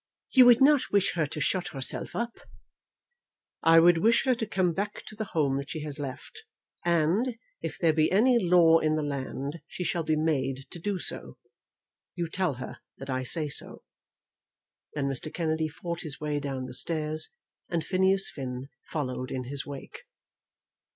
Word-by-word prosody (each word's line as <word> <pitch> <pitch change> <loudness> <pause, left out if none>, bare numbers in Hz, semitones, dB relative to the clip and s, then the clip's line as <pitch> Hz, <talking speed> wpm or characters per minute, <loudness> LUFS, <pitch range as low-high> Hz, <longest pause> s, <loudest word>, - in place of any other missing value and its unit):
"You 255 -2 +8
would 245 +1 +7
not 285 0 +5
wish 200 -1 +2
her 160 -4 0
to 150 - -6
shut 180 +3 0
herself 135 -2 -4
up." 235 0 -3 1.2
"I 165 0 +7
would 170 0 +6
wish 230 +7 +3
her 260 - +4
to 230 -2 -3
come 185 -3 +1
back 200 +5 -4
to 215 - -10
the 220 0 -3
home 145 -8 0
that 140 +2 -5
she 155 - -5
has 150 -1 -4
left, 135 -3 -7 0.4
and, 175 +9 +2 0.3
if - - -4
there 165 -2 +3
be 155 0 +2
any 235 +5 +4
law 170 -4 +5
in 155 -1 +1
the 155 - -1
land, 140 +2 -4
she 180 - -5
shall 175 -1 -1
be 155 -1 +1
made 135 -4 -1
to 175 - -8
do 200 +3 -2
so. - - -3 0.8
You 170 -2 -2
tell 180 -5 -1
her 125 - -8 0.2
that 135 0 -6
I 130 0 -1
say 150 +4 +1
so." 140 - -1 1.1
Then 145 -2 -1
Mr. 140 +2 -3
Kennedy 160 -2 -1
fought 170 +2 -5
his 150 -4 -4
way 150 -1 -1
down 135 -2 -4
the - - -8
stairs, 155 +2 0 0.4
and 170 -3 -1
Phineas 190 +1 +3
Finn 130 -1 -6 0.2
followed 130 -4 -3
in 130 - -3
his 140 +3 -3
wake. 140 -1 -9
160 Hz, 180 wpm, -28 LUFS, 140-185 Hz, 1.2 s, You